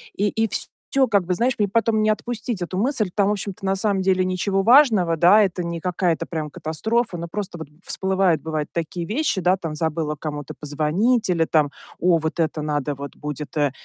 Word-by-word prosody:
И 205 +2 +1
и 225 +2 0
всё, 270 -2 -1
как 200 -4 +2
бы, 180 - 0
знаешь, 240 +6 +1
мне 205 - +3
потом 220 +1 +1
не 215 - +3
отпустить 220 -2 -2
эту 185 +1 -3
мысль. 220 -3 0
Там, 200 -1 +2
в - - +2
общем-то, 200 -1 -4
на 190 0 +1
самом 195 -1 0
деле 185 0 +2
ничего 190 +2 0
важного, 220 - +5
да, 185 +6 +6
это 180 -2 -1
не 170 0 -4
какая-то, 180 -2 0
прям, 155 -3 -4
катастрофа. 190 - -1
Но 170 0 -5
просто 195 -1 -5
вот 160 - -7 0.2
всплывает, 190 -3 +1
бывает, 155 -2 -3
такие 170 +1 -3
вещи, 220 - -1
да, 180 +2 +3
там 165 -4 -5
забыла 155 -1 -1
кому-то 145 -1 -6
позвонить 165 - +1
или 165 -2 +2
там: 150 -3 +2 0.3
"О, 175 0 +4
вот 160 +1 -3
это 155 -1 0
надо 145 -1 -2
вот 140 +1 -8
будет, 150 +1 -6
э 145 -2 +2
180 Hz, 205 wpm, -22 LUFS, 160-210 Hz, 0.3 s, да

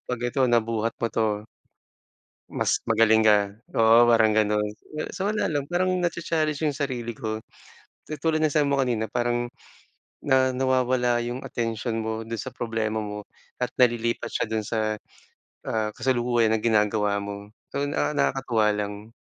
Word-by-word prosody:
pag 125 - -1
ito 120 +3 -1
nabuhat 115 -1 +1
mo 115 - -1
'to 105 -2 0 1.1
mas - - +1
magaling 110 0 +4
ka 105 -1 +3 0.2
oo 115 +1 +6
parang 115 -2 +4
gano'n. 105 -1 +2 0.5
So, 190 - -2
wala 215 - 0
lang 145 -3 -1
parang 180 +4 0
na 175 -1 0
cha - - -6
challenge 155 -3 -1
yung 150 -3 0
sarili 125 -5 -3
ko. 110 0 -4 0.7
Katulad 155 +1 -1
ng 155 -1 +2
sabi 150 -2 +3
mo 140 - +2
kanina 115 -5 0
parang 120 0 -1 0.7
na 130 -2 +3
nawawala 125 -2 +2
yung 120 +2 -4
atensyon 115 0 -2
mo 110 0 -3
do'n 115 0 -4
sa - - -5
problema 115 -3 -2
mo 105 0 -7 0.3
at - - 0
nalilipat 120 -1 +1
siya - - -1
do'n 110 -1 -2
sa, 110 -1 -1 0.7
ah, 110 -1 -1
kasalukuyan 120 -3 +1
na 110 - +2
ginagawa 105 -2 +1
mo. 100 0 -7 0.2
So, 145 0 -1
na 145 - 0
nakakatuwa 130 -6 +1
lang. 105 +2 -5
115 Hz, 155 wpm, -25 LUFS, 110-130 Hz, 1.1 s, oo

